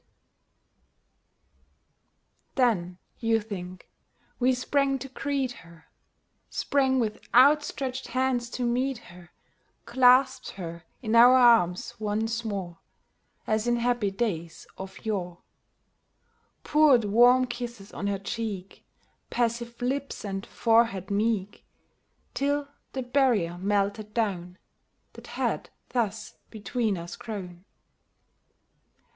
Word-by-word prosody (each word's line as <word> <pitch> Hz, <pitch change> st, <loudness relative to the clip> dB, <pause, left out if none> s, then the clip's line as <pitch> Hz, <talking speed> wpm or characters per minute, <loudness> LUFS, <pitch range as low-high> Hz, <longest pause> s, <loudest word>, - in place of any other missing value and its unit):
COMING 260 Hz, -, +4 dB
HOME 225 Hz, -, +1 dB
89 175 Hz, -, -8 dB
Then, 180 Hz, -, -16 dB, 0.2 s
you 225 Hz, -1 st, +2 dB
think, 185 Hz, -4 st, -8 dB, 0.5 s
we 255 Hz, +1 st, +3 dB
sprang 275 Hz, +2 st, +1 dB
to 270 Hz, -, -7 dB
greet 275 Hz, -1 st, -2 dB
her 170 Hz, -1 st, -18 dB, 0.3 s
— -, -, -47 dB, 0.3 s
Sprang 265 Hz, -2 st, +1 dB
with 215 Hz, -3 st, -2 dB
outstretched 265 Hz, -1 st, +3 dB
hands, 255 Hz, -2 st, 0 dB
to 250 Hz, -, -4 dB
meet 255 Hz, +2 st, 0 dB, 0.2 s
her; 175 Hz, -1 st, -15 dB, 0.6 s
Clasped 260 Hz, 0 st, +4 dB
her 170 Hz, -3 st, -8 dB, 0.2 s
in 220 Hz, 0 st, 0 dB
our 245 Hz, +2 st, +8 dB
arms 230 Hz, -8 st, +4 dB
once 220 Hz, +2 st, -1 dB
more, 200 Hz, -5 st, -4 dB
• 170 Hz, -, -22 dB, 0.7 s
As 215 Hz, +1 st, 0 dB
in 240 Hz, -, +3 dB
happy 240 Hz, -3 st, +1 dB
days 195 Hz, -6 st, -3 dB
of 190 Hz, +2 st, -10 dB
yore; 180 Hz, -5 st, -3 dB, 1.2 s
Poured 295 Hz, -7 st, +4 dB
warm 245 Hz, +5 st, +5 dB
kisses 240 Hz, -4 st, -7 dB
on 200 Hz, -, -3 dB
her 200 Hz, -1 st, 0 dB
cheek. 200 Hz, -2 st, -5 dB, 0.5 s
Passive 235 Hz, 0 st, -2 dB
lips 275 Hz, -1 st, -3 dB
and 195 Hz, -1 st, -4 dB
forehead 225 Hz, -5 st, +2 dB
meek, 205 Hz, -1 st, -1 dB, 0.7 s
Till 285 Hz, +1 st, 0 dB, 0.3 s
the 260 Hz, -, -3 dB
barrier 245 Hz, -10 st, +2 dB
melted 205 Hz, +2 st, -1 dB
down 185 Hz, -6 st, -2 dB, 0.6 s
That -, -, -13 dB
had -, -, -1 dB, 0.2 s
thus 220 Hz, -3 st, -2 dB
between 220 Hz, -1 st, -2 dB
us 170 Hz, 0 st, -7 dB
grown. 185 Hz, -5 st, -8 dB
230 Hz, 115 wpm, -27 LUFS, 195-250 Hz, 1.2 s, our